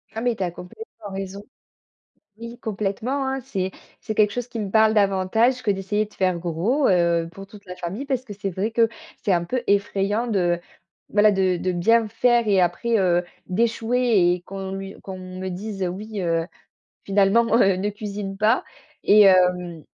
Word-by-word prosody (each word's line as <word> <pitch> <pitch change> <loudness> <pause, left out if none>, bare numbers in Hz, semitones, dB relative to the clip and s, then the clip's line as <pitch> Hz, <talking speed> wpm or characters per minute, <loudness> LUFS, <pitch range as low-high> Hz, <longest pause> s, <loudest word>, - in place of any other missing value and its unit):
Ah 225 - -3
mais 240 -1 +1
tu 195 - -3
as 175 - -2
complètement 205 - -11
raison. 195 +1 -6 0.9
Oui, 235 +1 -9
complètement, 220 +6 -2
hein, 265 0 -2
c'est 190 -5 -3 0.3
c'est 220 - -5
quelque 210 -1 +3
chose 245 +3 -4
qui 240 -2 -6
me 200 -3 -4
parle 220 0 +4
davantage 210 +5 +2
que - - -2
d'essayer 200 +2 0
de 210 - -19
faire 185 -2 0
gros, 180 - 0
heu, 170 -2 +2
pour 195 +3 -10
toute 200 +1 -15
la 180 -1 -8
famille. 190 +10 -5
Parce 265 -3 -2
que 215 - -9
c'est 200 0 -4
vrai 195 +5 -2
que 230 0 +3 0.4
c'est 200 - +2
un 170 -1 +1
peu 250 +8 -2
effrayant 200 +2 +1
de, 175 -6 +1 0.5
voilà 210 +1 +4
de 190 -2 +1
de 185 +2 -1
bien 225 +6 +3
faire 235 +1 +2
et 200 -2 +3
après, 200 +7 +1
heu, 175 -3 +2 0.2
d'échouer 225 -1 +2
et 180 - -10
qu'on 195 0 -6
lui 195 0 -6
qu'on 190 -1 -7
me 185 0 -6
dise, 195 +2 -5
heu: - - 0
«Oui 205 +3 -6
heu, 165 -2 0 0.6
finalement, 200 +4 +3
heu, 195 -5 +4
ne 195 +3 -1
cuisine 205 -2 -6
pas», 215 +5 +2 0.4
et 210 +1 +6
hem, 180 -3 +3
200 Hz, 185 wpm, -23 LUFS, 185-225 Hz, 0.9 s, et